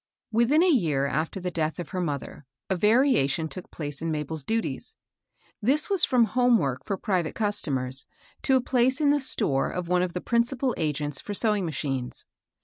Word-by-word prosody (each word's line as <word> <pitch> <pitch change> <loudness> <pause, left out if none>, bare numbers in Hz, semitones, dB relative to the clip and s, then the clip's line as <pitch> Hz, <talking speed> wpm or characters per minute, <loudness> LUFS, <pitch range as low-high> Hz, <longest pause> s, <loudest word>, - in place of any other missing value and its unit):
pITIIIN 245 +9 +4
a - - +4
year 155 - +1
after 155 +6 -2
the 180 0 -3
death 160 -2 -1
of 175 - -6
her 185 - -3
mother, 145 -3 -5 0.2
a - - +3
variation 210 - +3
took 180 +3 -9
place 145 -2 -6
in 165 - -2
Mabel's 150 0 -3
duties. 225 +8 -3 0.6
This 290 - +1
was 390 -4 +4
from 250 -2 +3
home 245 +2 +3
work 130 - -2
for 195 - -3
private 185 -5 -1
customers 135 - 0 0.3
to 265 - +3
a 260 - +3
place 255 +2 +1
in 290 -2 +4
the 290 0 +2
store 135 - +1
of 180 -1 -4
one 180 0 +3
of 180 -1 -2
the 180 - -2
principal 245 +2 0
agents 150 -3 -2
for 205 - -5
sewing 210 -3 +1
machines. 135 -4 -3
180 Hz, 185 wpm, -26 LUFS, 150-240 Hz, 0.6 s, pITIIIN